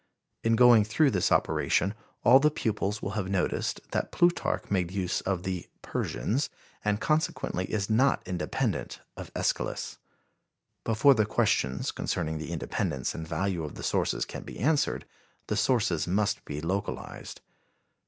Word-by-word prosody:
In 115 0 +3
going 120 -2 +7
through 135 +7 +3
this 95 -5 +1
operation 95 +4 +2 0.3
all 125 +3 +8
the 150 +2 +4
pupils 105 -6 -2
will - - -2
have 100 -3 -2
noticed 95 -2 -1
that - - -1
Plutarch 175 -9 +1
made 90 -3 +1
use 95 -1 -1
of 95 -2 -2
the 95 -2 -3 0.2
"Persians," 135 +7 -1 0.3
and, 105 0 +1
consequently 155 - 0
is 100 +1 -2
not 130 +5 +3
independent 90 -1 -2 0.2
of - - -8
Æschylus. - - -2 0.9
Before 115 +5 +5
the 110 -4 +1
questions 65 -9 +1
concerning 80 -3 -2
the 80 +1 -6
independence 70 -5 -2
and 80 0 -6
value 85 +1 -1
of 75 - -6
the - - -8
sources - - 0
can - - -7
be - - -9
answered, 145 +5 +1 0.4
the - - -2
sources 105 - +1
must 100 +3 0
be 75 +1 -5
localized. 95 +5 -4
100 Hz, 145 wpm, -28 LUFS, 90-115 Hz, 0.9 s, all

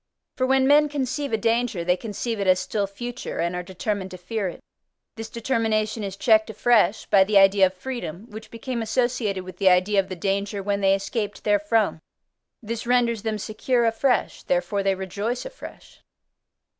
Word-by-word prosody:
For 255 - 0
when 265 0 +3
men 295 +2 +5
conceive 280 0 -2
a 220 - +2
danger, 225 -4 0
they 180 +1 +2
conceive 220 +3 -4
it 200 - -1
as 185 0 +5
still 200 +2 -2
future, 240 +5 -6
and 170 +1 -1
are 180 - -2
determined 190 +2 -4
to 185 - -9
fear 195 +3 -3
it; 175 - -7 0.6
this 225 0 -7
determination 225 -2 -1
is 195 -1 -5
checked 220 0 +3
afresh 220 -2 +2
by 195 -2 +5
the 205 +1 +2
idea 195 0 +6
of 185 - -8
freedom, 205 -3 -6
which 220 +1 -9
became 235 +1 -4
associated 225 -4 -1
with 185 -1 -10
the 195 -1 +4
idea 185 +3 +3
of 190 - -1
the 185 - -4
danger 200 +2 -2
when 200 0 -1
they 195 0 +4
escaped 205 +1 -4
therefrom: 205 -2 +1 0.6
this 230 +2 -5
renders 240 -3 +2
them 220 0 -2
secure 235 +4 0
afresh: 235 +3 +1
therefore 180 +3 0
they 195 -1 +1
rejoice 200 +6 -4
afresh. - - -11
210 Hz, 180 wpm, -24 LUFS, 195-235 Hz, 0.6 s, idea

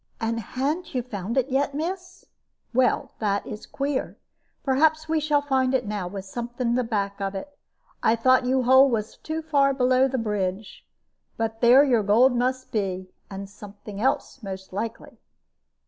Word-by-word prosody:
"And 230 +1 -1
ha'n't 275 - -3
you 250 - 0
found 220 0 -5
it 265 +1 +2
yet, 275 +1 0
miss? 360 +3 -5 0.5
Well, 260 +2 +2
that 200 -2 0
is 210 0 -8
queer. 280 -1 -3 0.5
Perhaps 315 +3 +2
we 320 0 +1
shall 295 -1 +1
find 265 -2 +1
it 260 - 0
now, 205 -3 -3
with 195 +1 -7
something 240 +4 -3
to - - +2
the 255 - +1
back 200 -3 -2
of 195 0 -2
it. 285 +9 -7 0.5
I 225 - +3
thought 255 +2 +3
yon 260 0 +2
hole 260 +2 +6
was 220 -3 -2
too 320 0 -5
far 280 -3 +2
below 255 0 +3
the 265 0 -2
bridge. 210 -3 -3 0.5
But 225 0 -3
there 245 +4 +7
your 245 -6 +3
gold 235 +6 +4
must 255 +1 -1
be, 185 -3 -2 0.2
and 195 0 -6
something 205 0 -10
else, 270 +1 -1
most 190 -2 -8
likely. 225 +3 -5
245 Hz, 170 wpm, -25 LUFS, 210-270 Hz, 0.5 s, there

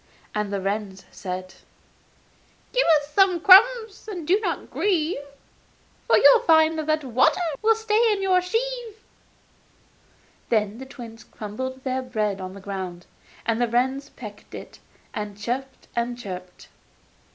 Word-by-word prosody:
And 210 -1 -2
the 200 - -1
wrens 195 0 -4
said: 185 -1 -6 1.2
'Give - - +2
us 290 +1 -12
some 385 -3 +4
crumbs, 440 +4 +5
then 360 -7 -6
you 360 +5 +4
need - - -7
not - - -3
grieve. 340 -6 0 0.9
For - - +5
you'll - - +7
find 320 -7 +4
that 310 0 0
water 255 +4 +2 0.2
will 445 +1 +4
stay 445 +1 +2
in 405 -2 -1
the 370 -1 +3
sieve.' 455 +3 -3 1.5
Then 215 0 0
the 265 - -8
twins 230 -4 -11
crumbled 260 +5 -7
their 260 0 -1
bread 215 -6 -2
on 185 +1 -7
the - - -9
ground, 185 -3 -6 0.4
and 230 +1 0
the 240 - +2
wrens 260 +4 0
pecked 210 -3 -11
it, - - -10 0.3
and 205 -1 -5
chirruped 255 +5 -5
and 240 0 -1
chirped. 185 -5 -9
260 Hz, 140 wpm, -24 LUFS, -, 1.5 s, you'll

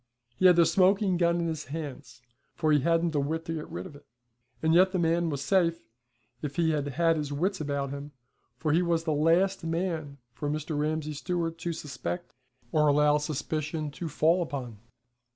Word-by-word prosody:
He 185 - +6
had 180 - +7
the 170 -1 +6
smoking 195 +2 +3
gun 170 0 +2
in 170 - -1
his 160 -2 -4
hands, 135 -5 -7 0.3
for 155 -2 +1
he 150 - +5
hadn't 165 +3 +2
the 150 - 0
wit 160 +4 -2
to 165 - -3
get 155 -1 -5
rid - - -6
of 170 -6 -10
it. 145 - -16 0.6
And 160 0 +3
yet 185 +2 +5
the - - +1
man 170 0 +1
was 140 -2 -3
safe, 170 - +1 0.5
if 145 -2 -4
he 165 -2 +2
had 145 -2 -1
had 165 +4 +2
his 145 -2 -3
wits 180 +5 -1
about 140 -2 -2
him, 140 +1 -7 0.5
for 155 +2 -1
he 170 - +4
was 170 -2 +1
the 160 -2 0
last 170 +6 +2
man 165 -4 -2 0.2
for 145 +4 -4
Mr. 155 +1 -3
Ramsay 155 +1 -1
Stewart 165 +2 -3
to 170 - -2
suspect 155 +3 -5 0.4
or 150 -2 +3
allow 150 +1 +4
suspicion 155 +1 -3
to 165 +3 -5
fall 165 +4 +3
upon. 130 -9 -5
160 Hz, 195 wpm, -28 LUFS, 145-170 Hz, 0.6 s, had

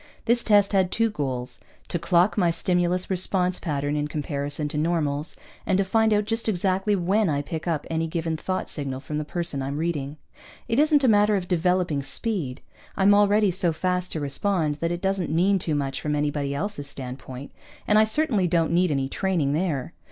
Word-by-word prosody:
This 235 0 +2
test 205 -2 +4
had 190 -2 +3
two 225 -1 +1
goals: 130 -7 -4 0.3
to 175 - -1
clock 175 +4 +3
my 180 -5 +3
stimulus 180 +2 0
response 185 0 0
pattern 145 -3 -2
in 150 0 -1
comparison 145 0 -3
to 150 - -4
normals, 155 -2 -1 0.3
and 185 - +1
to 195 - +3
find 220 +3 +2
out 210 -1 +2
just 225 +1 -1
exactly 195 +1 +1
when 195 +2 +1
I 145 -1 0
pick 160 +3 -5
up 160 -4 -1
any 165 0 -1
given 165 0 -2
thought 185 +4 -3
signal 135 -3 -4
from 150 +2 -4
the - - -2
person 165 -2 -3
I'm 140 +2 -3
reading. 150 -3 -2 0.5
It 230 +2 +1
isn't 300 -1 +4
a - - +5
matter 210 -1 +4
of 185 -2 -2
developing 180 -4 +1
speed. 140 - -3 0.4
I'm 200 +1 +5
already 205 0 +4
so 180 -1 +1
fast 180 +2 -1
to 160 - -2
respond 150 +1 0
that 165 +2 -1
it 175 0 -3
doesn't 190 -2 0
mean 185 +5 +2
too 160 -3 -1
much 135 -2 -2
from 150 -1 -1
anybody 145 -1 -1
else's 170 -3 -3
standpoint, 130 0 -8 0.4
and 210 0 +5
I - - +7
certainly 220 - +1
don't 165 -2 +1
need 180 +1 +3
any 135 -3 0
training 165 -3 0
there. 160 -2 -1
170 Hz, 195 wpm, -25 LUFS, 145-195 Hz, 0.5 s, I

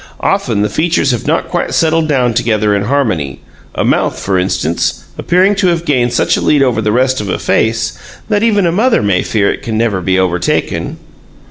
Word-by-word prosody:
Often 100 - 0
the 105 - 0
features 160 - +1
have 120 - -3
not - - 0
quite - - -2
settled 165 -1 +2
down 125 -5 +1
together 110 -3 +1
in 100 0 -1
harmony, 105 - -1 0.4
a - - -1
mouth, - - 0
for 95 -1 -1
instance, 90 -3 -1
appearing 185 +4 +2
to 200 -2 +2
have 170 -1 0
gained 125 -6 +1
such 120 - +1
a - - -2
lead 145 -2 +3
over 120 -4 +1
the 105 -1 0
rest 130 +2 +1
of 100 - -5
a - - -1
face, 110 0 0 0.3
that 210 -2 +1
even 210 -4 +2
a 170 - +2
mother 220 - +2
may 95 -3 +1
fear 105 -3 0
it - - -9
can 115 -4 -3
never 110 -5 0
be 95 +1 0
overtaken. 90 -1 -1
120 Hz, 205 wpm, -13 LUFS, 100-160 Hz, 0.4 s, lead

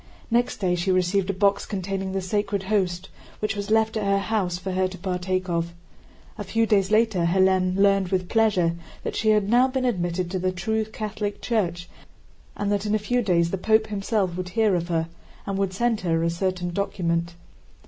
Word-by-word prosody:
Next 240 +1 +1
day 185 -3 0
she 180 +2 0
received 185 +1 +1
a - - +1
box 200 +1 +2
containing 195 -1 -3
the 190 0 -2
Sacred 200 +1 -1
Host, 190 -3 -1 0.3
which 215 +1 -2
was 205 0 -4
left 220 0 +2
at 215 - -1
her 200 0 +2
house 195 -3 -1
for 190 +1 -5
her 185 0 +1
to 185 0 -9
partake 185 0 -2
of. 170 -1 -2 0.6
A - - -2
few 225 +3 +1
days 200 -3 +2
later 215 -5 +2
Hélène 185 +1 +3
learned 195 -1 +3
with 185 -1 -1
pleasure 200 -7 +2 0.3
that - - -4
she 220 - +1
had 210 -2 +3
now 245 +4 +5
been 260 -1 -1
admitted 175 -5 -1
to 190 - -1
the 185 +1 0
true 220 +5 -1
Catholic 210 -1 -4
Church 180 -7 -1 0.7
and 205 0 -1
that 205 0 0
in 210 - +2
a - - +4
few 245 +4 0
days 170 -5 +2
the 195 - -2
Pope 220 +3 +3
himself 200 -3 -1
would 180 0 -4
hear 215 +2 +2
of 170 -1 0
her 165 -2 0 0.4
and 195 -1 -2
would 195 -1 0
send 230 +3 0
her 165 -2 0
a 170 - +1
certain 180 0 -2
document. 170 -3 -1
195 Hz, 200 wpm, -24 LUFS, 180-210 Hz, 0.7 s, now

